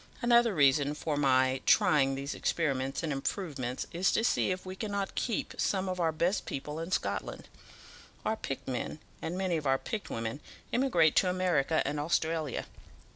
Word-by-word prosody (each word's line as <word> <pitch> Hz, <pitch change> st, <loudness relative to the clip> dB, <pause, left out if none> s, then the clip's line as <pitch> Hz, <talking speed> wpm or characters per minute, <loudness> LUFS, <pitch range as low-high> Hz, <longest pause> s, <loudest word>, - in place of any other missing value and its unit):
Another 235 Hz, -3 st, +4 dB
reason 145 Hz, 0 st, +4 dB
for 150 Hz, 0 st, -2 dB
my 130 Hz, -2 st, +3 dB
trying 135 Hz, -3 st, +4 dB
these 140 Hz, +1 st, -4 dB
experiments 135 Hz, -4 st, -1 dB
and 155 Hz, -3 st, -1 dB
improvements 135 Hz, -4 st, -3 dB
is 180 Hz, +3 st, +2 dB
to 225 Hz, -, +2 dB
see 235 Hz, -, +2 dB
if 185 Hz, 0 st, -3 dB
we 185 Hz, 0 st, -6 dB
cannot 200 Hz, -1 st, -3 dB
keep 230 Hz, -5 st, -2 dB
some 190 Hz, -1 st, 0 dB
of 185 Hz, -1 st, -3 dB
our 165 Hz, -2 st, +2 dB
best 170 Hz, +5 st, 0 dB
people 150 Hz, +3 st, -4 dB
in 165 Hz, +2 st, -5 dB
Scotland. -, -, -2 dB, 0.8 s
Our 220 Hz, -, +1 dB
picked 135 Hz, -10 st, -5 dB
men, 130 Hz, +3 st, -3 dB, 0.2 s
and 170 Hz, +3 st, -3 dB
many 185 Hz, -3 st, 0 dB
of 150 Hz, -3 st, -3 dB
our 135 Hz, 0 st, +4 dB
picked 210 Hz, +8 st, -5 dB
women, 115 Hz, +4 st, -3 dB, 0.3 s
emigrate 180 Hz, -, +3 dB
to 185 Hz, -, +4 dB
America 170 Hz, -5 st, +1 dB
and 145 Hz, +1 st, -1 dB
Australia. 160 Hz, -2 st, -1 dB
160 Hz, 170 wpm, -30 LUFS, 135-185 Hz, 0.8 s, Another